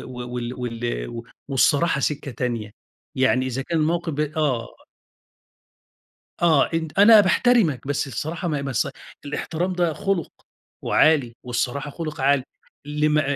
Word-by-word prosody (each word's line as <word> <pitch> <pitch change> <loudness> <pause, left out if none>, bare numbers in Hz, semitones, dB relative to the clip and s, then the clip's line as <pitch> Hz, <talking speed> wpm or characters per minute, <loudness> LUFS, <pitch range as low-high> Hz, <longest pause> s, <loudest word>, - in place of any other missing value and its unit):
و 125 -1 -7
-و - - -8
وال 120 0 -4
وال 115 - -4 0.3
والصراحة 140 +3 +2
سكّة 145 +1 -2
تانية، 120 -3 -3 0.5
يعني 130 0 +2
إذا 130 +1 -3
كان 165 +3 -2
الموقف 165 +1 0
ب 150 - -3
آه 150 -6 -1 1.7
آه. 160 -5 +4
أنت 160 +1 -3
أنا 210 +1 +9
باحترمك، 195 - +2
بس 145 0 -1
الصراحة 160 +7 -4
ما 150 -2 -1
هي - - -4
بس 135 -5 -1 0.4
الاحترام 170 +5 -3
ده 175 -2 +1
خُلُق 195 +1 -2 0.5
وعالي، 140 -7 +3
والصراحة 125 +4 -2
خُلُق 155 -1 -6
عالي. 135 -1 +3 0.4
اللي 150 +1 +1
مع 155 0 +3
145 Hz, 140 wpm, -23 LUFS, 125-160 Hz, 1.7 s, أنا